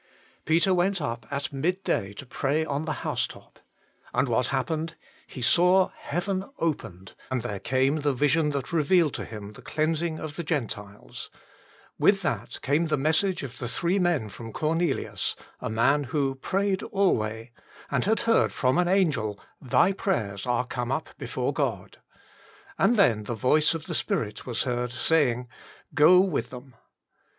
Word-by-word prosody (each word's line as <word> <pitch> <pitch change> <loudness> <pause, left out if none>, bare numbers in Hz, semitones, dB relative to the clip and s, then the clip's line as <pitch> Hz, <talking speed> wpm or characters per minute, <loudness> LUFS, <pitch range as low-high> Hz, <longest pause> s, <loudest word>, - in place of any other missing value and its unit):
Peter 170 +4 +3
went 185 +2 +2
up 120 -6 -4
at 140 0 -3
midday 155 - -1
to 120 +7 -9
pray 140 +4 0
on 145 +1 -2
the 155 -4 -4
housetop. - - -4 0.6
And 135 - +2
what 120 +1 +1
happened? 155 +4 -2 0.3
He 125 - -7
saw 180 +9 +4
heaven 185 +4 -3
opened, 95 - -3 0.2
and 130 -2 -1
there 105 -5 -4
came 130 +6 +1
the 145 -1 +1
vision 145 +4 +2
that 140 +2 -3
revealed 165 -1 +3
to - - -4
him 105 -2 -8
the 105 - -13
cleansing 160 +1 -1
of 155 -2 -7
the 170 - -2
Gentiles; 110 -10 -4 0.7
with - - +4
that - - -2
came 150 +5 +2
the 150 -1 +1
message 160 +6 +1
of 125 -3 -7
the 120 - -3
three 175 - 0
men 175 - +1
from 115 +3 -9
Cornelius, 160 +2 -1 0.2
a - - -4
man 130 +6 +2
who 135 +1 0
" 135 - -26
prayed 195 0 0
alway," 115 - 0 0.4
and 140 -3 +1
had 220 +3 +2
heard 230 0 +3
from 130 +4 +1
an 180 - +2
angel, 150 - +1
" - - -43
Thy 130 +8 +3
prayers 110 - -2
are 125 0 +1
come 125 0 -3
up 135 - -2
before - - -2
God - - -3 0.4
"; - - -25
and 220 +5 +4
then 115 - +4
the 120 - -3
voice 150 +8 +3
of 160 -1 -6
the 175 - -4
Spirit 105 -8 -2
was 120 -3 -1
heard 125 -1 -2
saying, 130 -2 +1 0.2
" - - -24
Go 180 +5 +7
with 175 -11 -1
them." 125 +1 -11
145 Hz, 170 wpm, -26 LUFS, 125-170 Hz, 0.7 s, Go